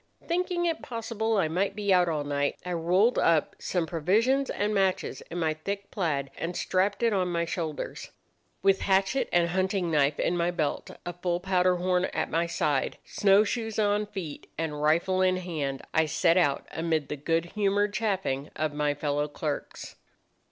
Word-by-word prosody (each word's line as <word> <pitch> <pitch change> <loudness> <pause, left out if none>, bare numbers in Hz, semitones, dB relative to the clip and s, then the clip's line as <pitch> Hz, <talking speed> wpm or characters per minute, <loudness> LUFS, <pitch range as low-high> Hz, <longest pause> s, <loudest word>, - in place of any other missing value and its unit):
"Thinking 350 0 0
it 330 -2 -1
possible 225 -1 -2
I 185 -5 +2
might 190 +5 -1
be 205 -2 +1
out 180 -1 +4
all 155 -3 -1
night, 145 0 -1
I 180 - -2
rolled 180 +8 +3
up 165 -3 +2
some 175 -3 -1
provisions 215 - +1
and 210 +1 -1
matches 195 -2 0
in 175 - -5
my 160 -2 +1
thick 200 +6 -5
plaid, 145 -8 -1
and 170 +2 -3
strapped 195 +4 0
it 230 -2 +3
on 185 -2 +1
my 170 0 0
shoulders. 165 -3 -4 0.5
With 195 0 +4
hatchet 195 +7 +2
and 170 -1 +3
hunting 185 -1 0
knife 145 -1 +2
in 175 - +1
my 170 0 +1
belt, 160 -4 -2 0.2
a 175 - -4
full 175 0 -1
powder 185 -1 +2
horn 180 +1 +1
at - - -3
my 170 +2 +1
side, 145 -4 0
snowshoes 215 +3 +2
on 210 0 +2
feet 185 -8 -7
and 150 -2 -3
rifle 170 +5 +2
in 185 0 +3
hand, 155 -7 -3
I 160 -1 +3
set 165 +2 +3
out 145 -7 +2
amid 160 -2 -1
the - - -2
good 165 +4 -1
humoured 205 0 +1
chaffing 190 -10 -1
of 155 -1 -1
my 150 0 0
fellow 145 0 -1
clerks. 150 0 -5
180 Hz, 175 wpm, -28 LUFS, 155-200 Hz, 0.5 s, out